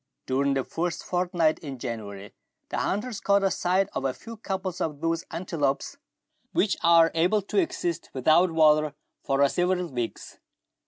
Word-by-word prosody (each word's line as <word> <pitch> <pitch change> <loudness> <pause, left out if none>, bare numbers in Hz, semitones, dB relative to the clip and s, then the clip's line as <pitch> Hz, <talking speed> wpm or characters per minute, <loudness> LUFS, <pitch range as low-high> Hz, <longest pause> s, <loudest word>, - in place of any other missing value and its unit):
During 135 +1 +1
the 135 - 0
first 170 +3 -3
fortnight 175 -3 +1
in 140 -4 -7
January 105 -5 -6 0.4
the - - -2
hunters 210 +2 -2
caught 200 -1 +3
sight 185 +2 +1
of - - -3
a 135 -1 -1
few 230 0 -10
couples 190 -4 -4
of 150 -3 -2
those 165 +1 -1
antelopes 160 - -2 0.6
which 200 - +2
are 165 -1 +6
able 180 +6 +2
to 205 - 0
exist 175 - -2
without 155 +7 +4
water 155 -2 +4 0.3
for 140 +1 +3
several 180 +4 0
weeks. 120 -2 -5
165 Hz, 150 wpm, -26 LUFS, 140-185 Hz, 0.6 s, are